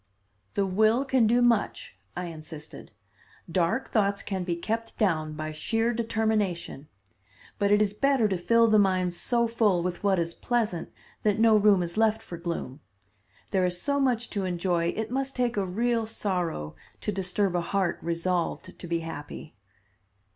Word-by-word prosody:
"The 200 - +2
will 215 +7 +3
can 260 -4 +3
do 240 +2 +3
much," 230 - +1 0.2
I 180 - -2
insisted. 155 -2 -9 0.6
"Dark 175 +9 0
thoughts 200 -2 +1
can 190 -2 -3
be 175 -1 -1
kept 225 +6 -3
down 155 -7 +1
by 155 0 -4
sheer 225 +9 0
determination. 220 -10 -1 0.7
But 200 -1 +2
it 205 +1 +5
is 205 -1 -1
better 270 0 +2
to 195 - 0
fill 230 +6 +4
the 215 -1 +5
mind 185 -3 +2
so 235 +6 +1
full 210 -6 +2
with 180 +2 -3
what 195 -2 +3
is 170 0 -1
pleasant 220 -8 -1 0.3
that 210 -1 +2
no 225 0 +5
room 205 -3 +5
is 170 +3 -5
left 220 0 +2
for 170 - -8
gloom. 165 -6 -4 0.7
There 190 -3 +2
is 180 0 0
so 280 +5 0
much 245 -3 0
to 200 -3 -2
enjoy 175 -1 0
it 220 +6 -3
must 270 +1 -2
take 245 -1 0
a 200 -2 0
real 230 +4 0
sorrow 180 - -2 0.3
to - - -1
disturb 190 0 0
a 175 - +2
heart 190 +1 -1
resolved 170 +1 -2
to 175 - -8
be 170 0 -1
happy." 155 -1 -8
200 Hz, 170 wpm, -27 LUFS, 175-225 Hz, 0.7 s, it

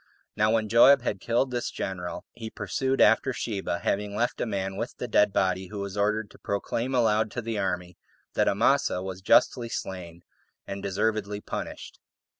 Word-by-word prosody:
Now 105 0 +3
when 110 -1 +1
Joab 120 +4 +6
had 100 -5 -2
killed 120 +6 0
this 120 -1 -2
general, 90 -2 -5
he 115 -2 -7
pursued 135 +3 -2
after 110 +4 +4
Sheba, 110 -6 -3
having 100 0 -1
left 120 +3 -1
a - - 0
man 95 -2 -2
with 115 +5 -5
the 125 - -4
dead 105 -2 +4
body, 95 -1 0
who 105 - -8
was 100 -1 -4
ordered 105 +1 0
to - - -17
proclaim 115 +5 -2
aloud 110 -3 +3
to 120 - -3
the 110 -1 -2
army, 90 -2 -3 0.3
that - - +2
Amasa 90 - +2
was 95 -1 -6
justly 115 +5 +3
slain, 85 -5 -6 0.4
and 100 0 -6
deservedly 105 +1 -1
punished. - - -7
105 Hz, 175 wpm, -27 LUFS, 95-115 Hz, 0.4 s, Joab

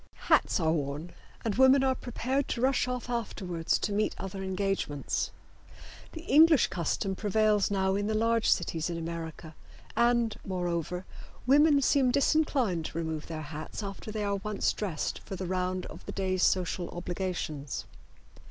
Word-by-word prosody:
Hats - - +4
are 160 -2 +2
worn 150 +2 -3 0.3
and 220 - +1
women 265 +3 +6
are 265 -1 +3
prepared 260 +2 -2
to 235 - -2
rush 260 0 +2
off 250 -1 -3
afterwards 190 -8 -1
to 205 - -2
meet 210 +1 0
other 195 0 -5
engagements. 190 -6 -1 0.8
The 325 - -7
English 315 -3 +6
custom 185 +3 -1
prevails 210 0 +2
now 190 -1 +1
in 205 +1 0
the 220 - 0
large 230 +1 +2
cities 165 -2 +1
in 170 - -3
America, 165 -1 -6 0.4
and, 235 -2 +3
moreover, 180 -1 -2 0.4
women 285 +2 +5
seem 265 -1 +4
disinclined 265 - +2
to - - -5
remove 160 -2 -3
their 155 -1 -5
hats 155 +7 -6
after 200 +2 -6
they 215 -1 -2
are 200 -1 0
once 210 +1 -1
dressed 185 -8 -3
for 195 - -7
the 185 - -4
round 185 0 -1
of - - -10
the - - -3
day's 185 -1 -1
social 180 -1 +1
obligations. 175 -6 -4
195 Hz, 155 wpm, -29 LUFS, 170-235 Hz, 0.8 s, women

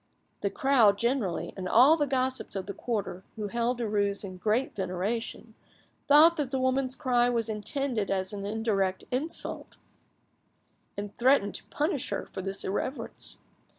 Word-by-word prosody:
The 200 - 0
crowd 225 -2 +4
generally, 235 -6 -1
and 185 -2 -4
all 260 +10 +7
the 295 -3 0
gossips 260 -3 -1
of 195 - -3
the 200 - -5
quarter, 200 -6 -3
who 210 -2 -4
held 235 +3 0
Derues 205 -3 0
in 185 -2 -7
great 220 +7 0
veneration, 195 +4 -3 0.5
thought 310 +4 +7
that 290 -4 -1
the 265 - -1
woman's 260 0 +1
cry 245 -4 +2
was 230 -2 0
intended 220 +1 -2
as 190 0 -1
an 200 -1 -5
indirect 200 -3 -1
insult, 280 +6 -4 1.2
and 205 0 -5
threatened 250 -5 +3
to - - -6
punish 295 -3 -1
her - - -3
for - - -7
this 195 +1 -1
irreverence. 260 +8 -3
230 Hz, 150 wpm, -28 LUFS, 200-260 Hz, 1.2 s, all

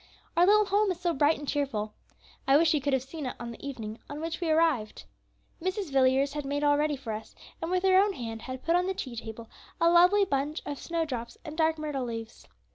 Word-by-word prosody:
"Our 345 +2 +5
little 425 +1 +6
home 405 +1 +2
is 350 - -5
so 350 -1 0
bright 295 +2 +3
and 290 - -8
cheerful! 225 -8 -1 0.5
I 270 +1 +6
wish 325 +1 +4
you 300 - +1
could 280 0 0
have 265 -1 +1
seen 275 +1 -6
it - - -5
on 235 0 -5
the 235 - -12
evening 230 -6 -6
on 285 - -6
which 330 +2 -4
we 335 - 0
arrived. 310 -9 +1 0.6
Mrs. 375 -2 -2
Villiers 270 +1 +3
had 295 -1 -3
made 285 +1 -2
all 290 0 +4
ready 300 0 +1
for 245 -5 -5
us, 215 +1 -8 0.3
and 330 - -3
with 365 0 0
her 380 -1 +6
own 405 0 +3
hand 225 -6 -6
had 255 +1 -7
put 335 +2 +2
on 360 +1 +2
the 380 - -1
tea 255 -8 -5
table 225 0 -7 0.3
a 335 0 +4
lovely 360 +4 +6
bunch 290 -2 -2
of 290 -1 -5
snowdrops 300 -9 -3
and 305 -1 -7
dark 320 0 +2
myrtle 295 -4 -3
leaves. 225 -1 -7
290 Hz, 235 wpm, -28 LUFS, 255-335 Hz, 0.6 s, little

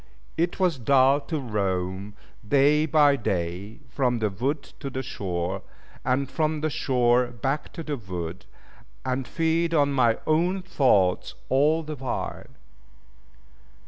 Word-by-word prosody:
It 170 +3 -1
was 180 -7 +2
dull 135 +3 +4
to 160 - -1
roam, 100 -4 -2 0.3
day 145 +4 +4
by 150 -2 +5
day, 100 - -3
from 125 -1 0
the 110 -2 0
wood 140 +9 -2 0.2
to 140 - -4
the 130 0 -4
shore; 95 -5 -3 0.4
and 135 +2 +1
from 155 +2 -1
the 155 0 0
shore 125 -2 +2
back 135 +5 -3
to 165 - -6
the 150 -2 -3
wood, 95 -2 -6 0.6
and 130 -1 -1
feed 165 +1 +1
on 145 -2 +3
my 120 -4 +3
own 175 +4 +1
thoughts 105 - +2
all 150 +5 +3
the 155 0 -5
while. 130 -1 -4
130 Hz, 135 wpm, -25 LUFS, 105-150 Hz, 0.6 s, by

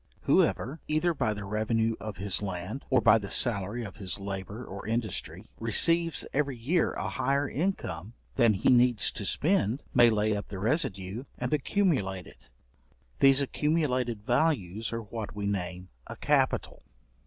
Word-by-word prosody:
Whoever, 140 +7 +1
either 155 +3 +1
by 110 -8 -1
the 100 -1 -6
revenue 110 +2 0
of 110 -2 -7
his 100 +1 0
land, 95 +6 -5
or 130 -2 +3
by 115 0 +5
the 100 -2 -7
salary 110 0 +1
of 100 0 -9
his 95 -2 -1
labour 100 +4 -6
or 100 +2 -8
industry, 110 -4 -4
receives 165 +9 +3
every 140 -2 -1
year 150 +9 0
a 95 - -4
higher 140 +8 0
income 120 - -3 0.2
than 115 -5 +3
he 95 - +1
needs 120 -2 +4
to 100 - -6
spend, 145 - +1
may 120 -1 +6
lay 105 -1 +1
up 100 - -5
the 100 - -7
residue 110 - -1
and 125 +3 -3
accumulate 135 - 0
it: - - -16 0.7
these 135 0 +6
accumulated 130 -7 -1
values 115 - 0
are 115 0 -4
what 105 0 -7
we 100 -1 -4
name 90 -2 -3 0.2
a - - -7
capital. - - 0
115 Hz, 155 wpm, -28 LUFS, 100-135 Hz, 0.7 s, may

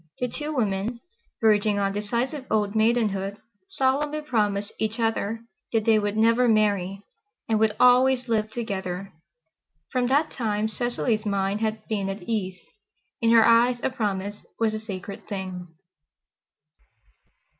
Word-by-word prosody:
The 250 - 0
two 295 +5 -4
women, 225 -3 -1 0.4
verging 210 -1 +3
on 195 -1 0
decisive 240 +7 -2
old 210 -2 +1
maidenhood, 215 -3 +1 0.3
solemnly 290 +3 0
promised 210 -7 -1
each 220 +2 -2
other 225 -1 -1 0.3
that 225 -2 +1
they 220 -1 +5
would 205 0 -2
never 230 +3 +4
marry, 200 -3 +1 0.4
and 220 -2 +1
would 220 -1 +2
always 250 0 +5
live 215 -2 0
together. 195 -4 -4 0.8
From 250 -1 +1
that 290 +5 +2
time 215 -3 -1
Cecily's 235 -1 -1
mind 200 +1 0
had 220 -1 -2
been 200 -3 -1
at 195 -1 -5
ease. 190 -3 -2 0.6
In 230 - +3
her 230 -1 +7
eyes 240 +1 +4
a - - +1
promise 205 -4 -3
was 225 -1 +1
a 215 - -3
sacred 200 -2 -7
thing. 185 -3 -5
220 Hz, 135 wpm, -25 LUFS, 200-240 Hz, 0.8 s, her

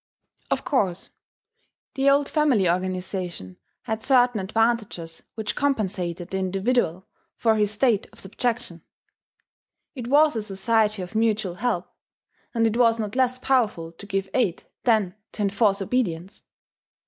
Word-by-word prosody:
] - - -40
Of - - -1
course 195 -10 0 0.8
the 275 0 +3
old 280 0 +3
family 280 - +2
organization 180 - -3 0.3
had 220 0 -3
certain 245 -3 +3
advantages 210 -5 -1
which 220 -1 -3
compensated 190 - -1
the 190 - -1
individual 190 -1 0 0.3
for 225 -2 +2
his 210 -2 +2
state 215 0 +1
of - - -14
subjection. 225 -3 -3 1.1
It 250 -5 -6
was 295 +1 +4
a 220 - -1
society 210 0 +1
of 180 - -9
mutual 215 -4 +1
help; 185 -3 -1 0.6
and 230 -2 +1
it 225 +1 +1
was 230 -2 +4
not 215 -1 -4
less 255 -1 +2
powerful 220 -11 0
to 175 +4 -12
give 195 -1 -1
aid, 205 -10 +1 0.2
than 215 -7 +3 0.2
to 210 - -2
enforce 200 0 +2
obedience. 190 -5 -2
210 Hz, 135 wpm, -24 LUFS, 185-240 Hz, 1.1 s, was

